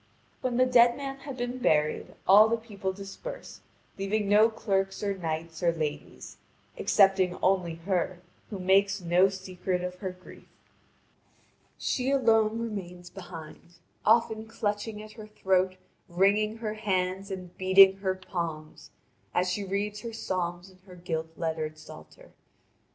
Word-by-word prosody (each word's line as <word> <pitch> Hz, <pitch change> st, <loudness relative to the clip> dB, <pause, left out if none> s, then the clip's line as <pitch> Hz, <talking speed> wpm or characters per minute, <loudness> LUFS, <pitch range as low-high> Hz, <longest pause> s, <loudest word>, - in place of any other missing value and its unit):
When 255 Hz, -2 st, -1 dB
the 255 Hz, -, +5 dB
dead 240 Hz, -1 st, +5 dB
man 275 Hz, -1 st, -5 dB
had 275 Hz, -1 st, -8 dB
been 245 Hz, +1 st, -3 dB
buried, 150 Hz, -9 st, +1 dB
all 210 Hz, +3 st, +8 dB
the 230 Hz, -, +1 dB
people 205 Hz, -4 st, -5 dB
dispersed, 200 Hz, -, -9 dB, 0.4 s
leaving 200 Hz, +1 st, -1 dB
no 210 Hz, +3 st, +6 dB
clerks 195 Hz, -3 st, -1 dB
or 200 Hz, -1 st, 0 dB
knights 160 Hz, -2 st, -4 dB
or 170 Hz, -1 st, +3 dB
ladies, 155 Hz, -3 st, -5 dB, 0.4 s
excepting 195 Hz, -3 st, +3 dB
only 180 Hz, -3 st, +2 dB
her 180 Hz, +1 st, -2 dB, 0.3 s
who 205 Hz, -, -5 dB
makes 195 Hz, +2 st, +3 dB
no 180 Hz, +2 st, +3 dB
secret 185 Hz, -1 st, -4 dB
of 180 Hz, 0 st, -5 dB
her 190 Hz, -, -3 dB
grief. 180 Hz, 0 st, -14 dB, 1.3 s
She 255 Hz, 0 st, -1 dB
alone 225 Hz, -5 st, +3 dB
remains 185 Hz, -6 st, -6 dB
behind, 170 Hz, -2 st, -11 dB, 0.3 s
often 220 Hz, 0 st, +2 dB
clutching 210 Hz, -1 st, -3 dB
at 215 Hz, -, -12 dB
her 215 Hz, -1 st, -11 dB
throat, 190 Hz, -3 st, +1 dB, 0.3 s
wringing 205 Hz, +5 st, +2 dB
her 220 Hz, -2 st, -3 dB
hands, 195 Hz, -2 st, -1 dB
and 185 Hz, -2 st, -7 dB
beating 190 Hz, +1 st, +7 dB
her 190 Hz, -1 st, -1 dB
palms, 170 Hz, -4 st, -6 dB, 0.5 s
as 180 Hz, 0 st, +2 dB
she 200 Hz, +3 st, -2 dB
reads 200 Hz, +2 st, -2 dB
her 230 Hz, +1 st, -7 dB
psalms 180 Hz, -3 st, -3 dB
in 185 Hz, -, -22 dB
her 180 Hz, -, -12 dB
gilt 165 Hz, -2 st, -3 dB
lettered 160 Hz, -2 st, -3 dB
psalter. 155 Hz, -, -14 dB
195 Hz, 140 wpm, -28 LUFS, 180-215 Hz, 1.3 s, all